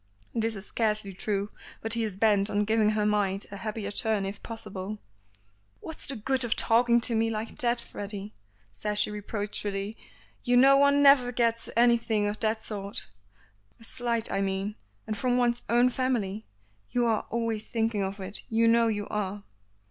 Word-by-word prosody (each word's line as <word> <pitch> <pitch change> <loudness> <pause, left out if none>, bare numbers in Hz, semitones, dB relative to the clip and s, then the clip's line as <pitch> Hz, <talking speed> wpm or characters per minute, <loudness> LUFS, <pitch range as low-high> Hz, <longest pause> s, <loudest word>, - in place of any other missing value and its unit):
This 225 -1 0
is 195 0 -8
scarcely 210 -3 -1
true, 200 +1 -2 0.3
but 225 0 -1
he 235 - +1
is 210 -4 -3
bent 205 -1 +3
on 205 0 +1
giving 220 0 +3
her 215 -1 +1
mind 205 -1 +1
a 200 - -6
happier 210 -1 -4
turn 215 -2 +1
if 195 +1 -6
possible. 210 -3 -6 0.8
"What's 320 - -6
the 275 - -1
good 260 +4 +1
of 235 -2 0
talking 235 +1 +3
to 230 - +6
me 225 0 +2
like 220 0 -5
that, 240 -1 +1
Freddy," 205 -2 -7 0.4
says 210 - -3
she 210 - +3
reproachfully. 205 0 -4 0.5
"You 245 -1 +3
know 270 +2 +7
one 280 0 +4
never 275 -3 +7
forgets 235 -2 0
anything 235 -3 +3
of 205 +1 -2
that 220 0 0
sort. 200 - -5 0.7
A - - -16
slight 235 -1 -2
I 195 - 0
mean; 195 +1 -2 0.3
and 215 - -3
from 245 +4 +1
one's 240 -1 +1
own 240 +2 +4
family. 225 -6 -2 0.4
You 245 -1 +1
are 225 -2 0
always 230 -2 -2
thinking 225 -2 -1
of 195 +1 -3
it; 190 +1 -4
you 230 0 +3
know 230 0 +4
you 205 -2 -2
are." 205 -1 -3
220 Hz, 175 wpm, -28 LUFS, 205-235 Hz, 0.8 s, know